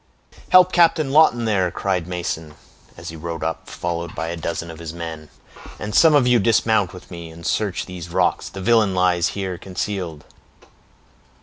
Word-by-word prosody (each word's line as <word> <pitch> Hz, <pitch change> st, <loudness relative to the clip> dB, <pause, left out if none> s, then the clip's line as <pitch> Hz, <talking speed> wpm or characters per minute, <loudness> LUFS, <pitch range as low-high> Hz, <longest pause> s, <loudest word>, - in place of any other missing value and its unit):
"Help 185 Hz, 0 st, +7 dB
Captain 165 Hz, -5 st, +3 dB
Lawton, 135 Hz, -6 st, +4 dB
there!" 95 Hz, -5 st, +1 dB
cried 90 Hz, -1 st, -2 dB
Mason, 85 Hz, -4 st, -4 dB, 0.4 s
as 80 Hz, 0 st, -8 dB
he 80 Hz, -, -8 dB
rode 80 Hz, 0 st, -5 dB
up, 80 Hz, 0 st, -4 dB
followed 85 Hz, 0 st, -4 dB
by 80 Hz, 0 st, -3 dB
a 85 Hz, -, -3 dB
dozen 85 Hz, 0 st, -4 dB
of 80 Hz, -, -11 dB
his 80 Hz, -2 st, -6 dB
men; 80 Hz, -2 st, -7 dB, 0.5 s
"and 105 Hz, 0 st, -6 dB
some 160 Hz, -2 st, +6 dB
of 140 Hz, -4 st, +4 dB
you 125 Hz, -1 st, +4 dB
dismount 110 Hz, -2 st, +2 dB
with 90 Hz, -, -13 dB
me, 85 Hz, -2 st, -8 dB
and 80 Hz, +1 st, -12 dB
search 105 Hz, -4 st, -1 dB
these 90 Hz, -2 st, -8 dB
rocks; -, -, 0 dB
the 95 Hz, -, -8 dB
villain 105 Hz, -2 st, +3 dB
lies 90 Hz, -1 st, +2 dB
here 95 Hz, -3 st, -3 dB
concealed." 90 Hz, -5 st, -5 dB
90 Hz, 175 wpm, -21 LUFS, 85-110 Hz, 0.5 s, Help